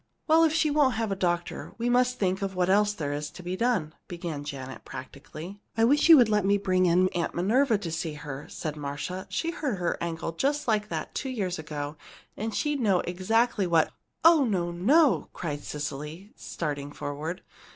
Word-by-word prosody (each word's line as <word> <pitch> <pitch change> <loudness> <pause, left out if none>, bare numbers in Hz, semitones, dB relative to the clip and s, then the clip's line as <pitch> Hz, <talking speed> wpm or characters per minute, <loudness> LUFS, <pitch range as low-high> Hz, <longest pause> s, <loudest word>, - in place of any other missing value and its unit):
"Well, 325 +1 +5
if 320 - +4
she 315 -1 +2
won't 285 -4 +3
have 225 -2 -1
a - - 0
doctor, 175 -2 -2
we 235 +1 -1
must 250 +1 +3
think 190 -3 0
what 190 -2 0
else 205 +1 +4
there 150 -8 -3
is 150 +1 -3
to 180 - -12
be 180 +1 -3
done," 190 -9 0
began 170 -4 -5
Janet, 135 -2 -7
practically. 155 +8 -9 0.2
"I 225 - +3
wish 290 +7 +4
you'd 275 -8 +9
let 210 -2 +2
me 200 +1 +3
bring 185 -2 +2
Aunt 175 0 +1
Minerva 230 +8 +3
in 205 - -2
to 170 - -4
see 160 -1 -3
her," 145 -1 -7
said 155 -2 -5
Marcia. 145 +6 -5
"She 330 - -1
hurt 280 - -2
her 175 -1 -1
ankle 165 -1 -3
just 280 - -1
like 215 -2 +1
that, - - -4
two 270 - -3
years 190 -9 -2
ago, 150 -1 -5 0.4
and 220 +1 -4
she'd 295 -2 0
know 200 -7 +3
exactly 200 +3 +1
what 165 -2 +3 0.2
" - - -18
"Oh, 330 -3 +7
no, 180 -8 0
no!" 270 - +3
cried 150 -4 -4
Cecily, 150 +6 -6
starting 145 -3 -4
forward. 150 +5 -5
185 Hz, 195 wpm, -27 LUFS, 160-230 Hz, 0.4 s, you'd